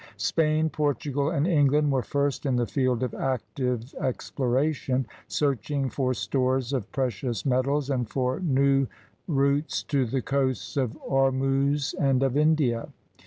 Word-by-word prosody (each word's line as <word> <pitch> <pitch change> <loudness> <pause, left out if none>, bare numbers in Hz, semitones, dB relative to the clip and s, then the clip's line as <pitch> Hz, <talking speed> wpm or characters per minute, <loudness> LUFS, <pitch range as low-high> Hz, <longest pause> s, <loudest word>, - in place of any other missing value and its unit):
Spain, 155 0 +1
Portugal, 145 -2 -1
and 155 -2 0
England 150 -3 +3
were 135 -2 +2
first 140 +2 -1
in 130 - +1
the 120 -1 +1
field 130 -1 0
of 125 - -2
active 125 -1 -2
exploration, 130 +1 0 0.2
searching 140 -1 -1
for 130 -2 0
stores 130 0 0
of 125 -7 -3
precious 125 -4 -2
metab 135 +2 +1
and 125 -4 -1
for 130 0 -1
new 135 -5 +2 0.4
routes 140 -1 +1
to 135 -4 0
the 130 +2 -2
coasts 135 -3 -1
of 130 -5 -1
Ormuz 135 +1 +1
and 135 -2 +2
of 135 -1 +1
India. 150 -6 +2
135 Hz, 135 wpm, -26 LUFS, 130-145 Hz, 0.4 s, England